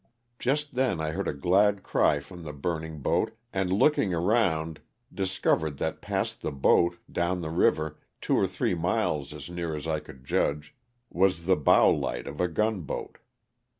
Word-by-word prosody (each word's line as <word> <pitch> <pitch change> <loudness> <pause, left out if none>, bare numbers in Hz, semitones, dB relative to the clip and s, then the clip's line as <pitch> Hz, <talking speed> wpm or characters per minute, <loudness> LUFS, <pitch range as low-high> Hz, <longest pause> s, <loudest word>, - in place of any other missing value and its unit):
Just 145 +3 0
then 125 -9 +1
I 80 0 -1
heard 95 +2 -3
a - - +1
glad 95 +7 +3
cry 75 - +2
from 85 +5 -11
the 75 -2 -7
burning 80 +1 -4
boat 110 - 0 0.2
and 95 -1 0
looking 100 - +3
around 85 -5 +1 0.3
discovered 90 -6 0
that - - -3
past - - -2
the - - -2
boat, 85 +5 +3
down 90 +1 0
the 80 -1 -4
river, 80 -2 +1 0.2
two - - 0
or - - +3
three - - -1
miles 85 -4 0
as - - -8
near 85 -2 -4
as 75 - -6
I 80 -1 0
could 65 -3 -14
judge, 75 +2 -1 0.4
was 90 -2 +2
the 95 +1 +4
bow 75 - +5
light - - -2
of 70 +4 -5
a 90 - +3
gun 105 +4 0
boat. 75 - -6
85 Hz, 175 wpm, -27 LUFS, 80-95 Hz, 0.4 s, bow